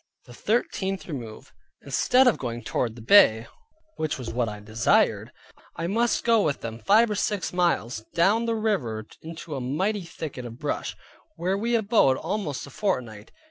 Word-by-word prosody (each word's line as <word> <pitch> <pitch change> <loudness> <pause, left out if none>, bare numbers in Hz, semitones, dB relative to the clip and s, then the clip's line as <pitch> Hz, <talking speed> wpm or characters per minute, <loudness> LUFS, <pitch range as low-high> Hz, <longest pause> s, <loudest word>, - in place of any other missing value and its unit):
THE 120 - -13
THIRTEENTH 195 - -1
REMOVE 120 -9 -8 0.3
Instead 250 - +3
of 245 - +3
going 120 -2 -4
toward 115 +1 -2
the 115 - -11
Bay, 115 - +6 0.5
which 155 -1 -2
was 125 -4 -6
that 120 -2 0
I 105 0 -7
desired, 110 +3 +1 0.4
I 165 - -3
must 230 +6 +1
go 230 -2 +4
with 150 -7 -1
them 115 0 -6
five 215 - +4
or - - +1
six 205 -3 -2
miles 165 -11 0
down 200 +7 +3
the 230 - +1
river 130 - -1 0.2
into 165 0 -8
a 135 - -3
mighty 190 +12 -1
thicket 155 -6 -7
of 115 -1 -8
brush; 150 +1 -3 0.4
where 185 +3 -1
we 230 +4 0
abode 210 - +3
almost 150 - -3
a 140 - -13
fortnight. 120 - -3
160 Hz, 170 wpm, -25 LUFS, -, 0.5 s, Bay